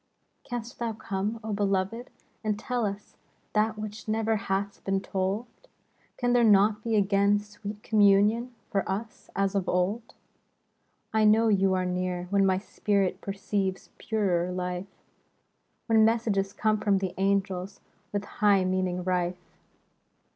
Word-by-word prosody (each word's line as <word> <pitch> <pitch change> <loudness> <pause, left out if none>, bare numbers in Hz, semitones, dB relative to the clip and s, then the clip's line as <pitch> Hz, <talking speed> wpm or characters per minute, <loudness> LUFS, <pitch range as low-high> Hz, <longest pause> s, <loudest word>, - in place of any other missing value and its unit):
Canst 240 -1 -6
thou 235 -1 -1
come, 210 +1 -3
O 220 -1 -3
beloved! 200 +4 -1 0.3
and 210 -1 0
tell 240 0 -1
us 200 +1 -7 0.4
That 215 0 +1
which 215 0 -7
ne'er 220 +1 +1
hath 200 -1 -2
been 195 0 0
told? 195 +4 -2 0.7
Can 245 0 +1
there 245 -1 +4
not 210 0 +5
be 230 -1 0
again 200 0 +3
sweet 210 0 -8
communion 210 +3 +4 0.2
For 195 - +2
us, 215 +3 -5
as 195 0 +1
of 195 -2 -1
old? 195 +6 -1 1.0
I 220 0 +3
know 220 +1 +5
you 195 -2 +3
are 185 0 0
near, 180 0 -2
when 200 -1 +4
my 190 -1 +3
spirit 195 -1 -1
Perceives 195 -1 -3
purer 185 -5 0
life; 180 +1 -3 1.0
When 225 -1 +4
messages 220 -4 +1
come 215 +1 +1
from 205 -2 +2
the 190 -2 -2
angels 195 -1 0 0.3
With 205 0 -2
high 200 -3 +2
meaning 185 -1 -1
rife. 180 -1 0
200 Hz, 140 wpm, -28 LUFS, 190-215 Hz, 1.0 s, not